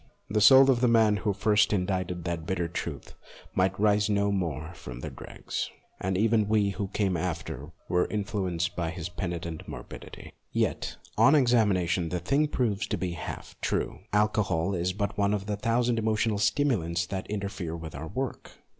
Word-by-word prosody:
The 105 Hz, 0 st, +2 dB
soul 135 Hz, +4 st, +8 dB
of 120 Hz, -2 st, +1 dB
the 125 Hz, -, +4 dB
man 110 Hz, -3 st, +4 dB
who 105 Hz, 0 st, 0 dB
first 105 Hz, +2 st, +3 dB
indited 90 Hz, -3 st, -1 dB
that 85 Hz, -1 st, -3 dB
bitter 90 Hz, -3 st, 0 dB
truth 85 Hz, -, -5 dB, 0.4 s
might 95 Hz, +1 st, +1 dB
rise 105 Hz, 0 st, +3 dB
no 100 Hz, 0 st, +2 dB
more 85 Hz, -4 st, -2 dB
from 65 Hz, -5 st, -9 dB
the -, -, -5 dB
dregs, -, -, -5 dB, 0.3 s
and 95 Hz, 0 st, -1 dB
even 110 Hz, 0 st, +3 dB
we 105 Hz, -2 st, +2 dB
who 100 Hz, 0 st, -3 dB
came 95 Hz, -1 st, 0 dB
after 85 Hz, 0 st, -4 dB, 0.2 s
were 90 Hz, 0 st, +2 dB
influenced 95 Hz, -5 st, -2 dB
by 85 Hz, -2 st, -1 dB
his 90 Hz, 0 st, -5 dB
penitent 85 Hz, -3 st, -5 dB
mor -, -, -6 dB
bidity. -, -, -11 dB, 0.2 s
Yet, -, -, -1 dB, 0.2 s
on 150 Hz, -, +7 dB
examination, 100 Hz, -, +3 dB
the 90 Hz, -, -1 dB
thing 140 Hz, -, +1 dB
proves 115 Hz, -8 st, 0 dB
to -, -, -1 dB
be 90 Hz, 0 st, -2 dB
but 85 Hz, -, -8 dB
half -, -, -7 dB
true. -, -, -1 dB
Alcohol 105 Hz, -4 st, +1 dB
is 90 Hz, 0 st, 0 dB
but 100 Hz, +2 st, -3 dB
one 100 Hz, +1 st, +3 dB
of 100 Hz, -1 st, -4 dB
the 105 Hz, 0 st, -1 dB
thousand 115 Hz, +2 st, +1 dB
emotional 110 Hz, -1 st, +1 dB
stimulants 95 Hz, -, +1 dB
that 95 Hz, +1 st, -5 dB
inter 100 Hz, -1 st, -2 dB
fere 85 Hz, -5 st, -5 dB
with 80 Hz, -2 st, -8 dB
our 70 Hz, +4 st, -6 dB
work. 130 Hz, +7 st, -4 dB
100 Hz, 180 wpm, -28 LUFS, 85-110 Hz, 0.4 s, soul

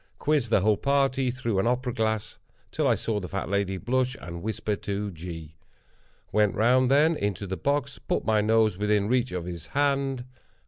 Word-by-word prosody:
Quizzed 145 Hz, -6 st, +1 dB
the 105 Hz, -, +3 dB
whole 105 Hz, +1 st, +3 dB
party 135 Hz, -2 st, +1 dB
through 120 Hz, -5 st, -1 dB
an 95 Hz, -, +1 dB
opera 125 Hz, 0 st, 0 dB
glass, 110 Hz, -1 st, -2 dB, 0.3 s
till -, -, 0 dB
I -, -, +4 dB
saw 110 Hz, -2 st, -2 dB
the 90 Hz, -, -6 dB
fat 95 Hz, -1 st, -4 dB
lady 100 Hz, -1 st, 0 dB
blush 130 Hz, +5 st, 0 dB
and 85 Hz, -1 st, -7 dB
whisper 105 Hz, 0 st, -2 dB
to 100 Hz, 0 st, -3 dB
G. 80 Hz, -2 st, -8 dB, 0.8 s
Went 105 Hz, -2 st, +2 dB
round, 125 Hz, +4 st, +4 dB
then, 150 Hz, +4 st, +4 dB
into 100 Hz, -6 st, -2 dB
the 95 Hz, 0 st, -3 dB
box, 140 Hz, -, -1 dB
and -, -, -23 dB
put -, -, 0 dB
my 110 Hz, -1 st, +3 dB
nose 110 Hz, -2 st, +2 dB
within 105 Hz, -1 st, +2 dB
reach 125 Hz, -2 st, +1 dB
of 90 Hz, -2 st, -4 dB
his 85 Hz, -2 st, -7 dB
hand. 135 Hz, -3 st, +1 dB
110 Hz, 190 wpm, -26 LUFS, 100-130 Hz, 0.8 s, I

